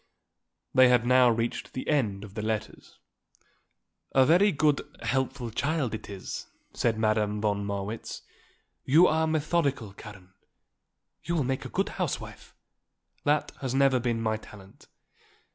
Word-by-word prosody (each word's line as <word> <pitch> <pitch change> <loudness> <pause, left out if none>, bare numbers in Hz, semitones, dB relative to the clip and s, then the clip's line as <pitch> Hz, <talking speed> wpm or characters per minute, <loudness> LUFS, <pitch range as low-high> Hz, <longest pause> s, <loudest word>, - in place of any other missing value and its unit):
They 130 0 +7
had 125 -1 +3
now 125 0 +5
reached 115 0 -2
the 130 - -5
end 110 -10 0
of 100 -2 -11
the 105 - -4
letters. 110 0 -4 1.2
"A 130 -1 +5
very 180 +8 +5
good, 150 -2 +2 0.2
helpful 125 0 -1
child 140 0 -1
it 110 -1 -6
is," 100 -2 -6 0.3
said 115 -2 0
Madame 110 -1 +1
von 105 -1 0
Marwitz. 100 +2 -5 0.6
"You 155 +7 +6
are 160 -1 +2
methodical, 150 - 0
Karen. 95 -2 -13 0.9
You 170 - -2
will 155 - +1
make 130 +1 -2
a - - -6
good - - -1
housewife. - - -4 0.7
That 150 +1 +1
has 130 -1 -3
never 135 -2 +4
been 120 -1 -1
my 110 -1 0
talent." 100 -2 -15
120 Hz, 140 wpm, -28 LUFS, 105-140 Hz, 1.2 s, They